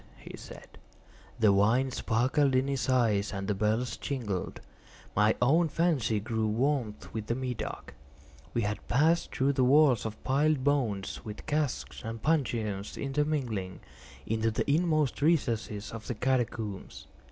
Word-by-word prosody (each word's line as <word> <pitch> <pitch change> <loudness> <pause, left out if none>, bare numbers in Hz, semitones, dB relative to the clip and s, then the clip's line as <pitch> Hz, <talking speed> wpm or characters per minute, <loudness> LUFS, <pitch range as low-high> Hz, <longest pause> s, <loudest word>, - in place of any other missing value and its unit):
he - - -10
said. - - -12 0.6
The 105 -3 +5
wine 115 +7 +3
sparkled 130 +4 +1
in 130 +1 +2
his 135 -1 -1
eyes 110 -6 +2
and 95 -1 -4
the 105 - +1
bells 110 +5 0
jingled. 110 -10 -4 0.6
My 105 +1 +4
own 160 +6 +3
fancy 140 -11 +1
grew 110 +1 -1
warm 120 0 0 0.2
with 110 -1 -4
the 115 - 0
Medoc. 125 -2 -5 0.6
We 120 - +1
had 105 +1 -3
passed 160 +6 +2
through 140 0 +2
walls 130 -2 +5
of 110 0 -9
piled 140 +1 +2
bones, 120 -9 0
with 105 -1 -8
casks 150 -3 -2
and 115 0 -5
puncheons 115 -9 -1
intermingling, 135 -10 -2 0.4
into 110 0 0
the 110 - -2
inmost 155 -3 +1
recesses 115 -9 0
of 115 -1 -8
the 125 - -3
catacombs. 115 -4 -2
120 Hz, 140 wpm, -29 LUFS, 110-140 Hz, 0.6 s, The